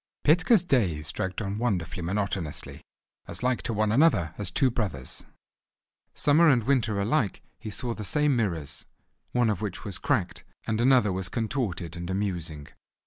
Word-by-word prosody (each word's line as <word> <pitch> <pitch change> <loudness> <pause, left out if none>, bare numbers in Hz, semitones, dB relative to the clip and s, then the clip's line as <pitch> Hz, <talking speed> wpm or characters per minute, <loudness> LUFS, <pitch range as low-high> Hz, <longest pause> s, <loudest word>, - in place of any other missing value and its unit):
Petka's 180 +7 +4
days 90 - 0
dragged 95 +3 -3
on 100 +1 -3
wonderfully 90 -7 -1
monotonously, 95 -3 -2 0.5
as 85 +5 -5
like 125 -1 +1
to 120 - -3
one 110 -1 +1
another 110 - +3
as 100 -2 +2
two 130 +9 +2
brothers. 95 - -2 0.9
Summer 155 +4 +4
and 125 -5 +3
winter 115 -5 +1
alike 110 0 0 0.2
he 110 - -7
saw 120 +3 -2
the 110 - -7
same 150 +5 +2
mirrors, 85 - -3 0.4
one 120 -3 +2
of 105 - -3
which 105 -4 -5
was 100 -4 -4
cracked, 115 -12 -1 0.2
and 110 0 -1
another 125 -6 +4
was 95 -1 -3
contorted 110 - -3
and 85 +1 -6
amusing. 85 -7 -3
105 Hz, 155 wpm, -27 LUFS, 90-125 Hz, 0.9 s, Petka's